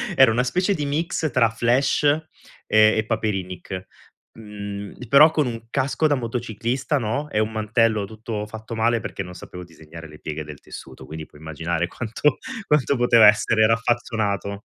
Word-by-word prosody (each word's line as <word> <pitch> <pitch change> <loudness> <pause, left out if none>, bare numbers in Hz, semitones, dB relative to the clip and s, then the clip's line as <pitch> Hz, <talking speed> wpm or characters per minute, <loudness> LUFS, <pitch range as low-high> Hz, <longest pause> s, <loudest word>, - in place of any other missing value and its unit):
era 135 -4 +6
una 125 +3 +1
specie 180 +9 0
di 150 -2 -3
mix 155 +1 -1
tra 115 -3 +3
Flash 120 +6 +1 0.6
e 110 0 +5
e 110 - 0
Paperinik; 95 -4 -3 0.5
mhmm, 105 +1 -8
però 150 +5 +7
con 150 -5 +1
un 115 -1 -6
casco 140 +3 0
da 145 - +2
motociclista, 120 +3 -2
no, 130 +7 -2
e 105 - 0
un 110 +1 0
mantello 110 -1 +1
tutto 110 0 -6
fatto 110 +1 -8
male, 115 +1 +2
perché 100 - -5
non 90 0 -10
sapevo 90 0 -10
disegnare 80 -1 -12
le 75 0 -14
pieghe 75 0 -5
del 75 -2 -10
tessuto, 65 - -11
quindi 80 0 -7
puoi 75 - -19
immaginare 80 +2 -2
quanto 120 +8 -1 0.3
quanto 145 -2 +2
poteva 120 -2 +5
essere 110 +1 +4
raffazzonato. 110 -3 -1
110 Hz, 165 wpm, -22 LUFS, 100-125 Hz, 0.6 s, però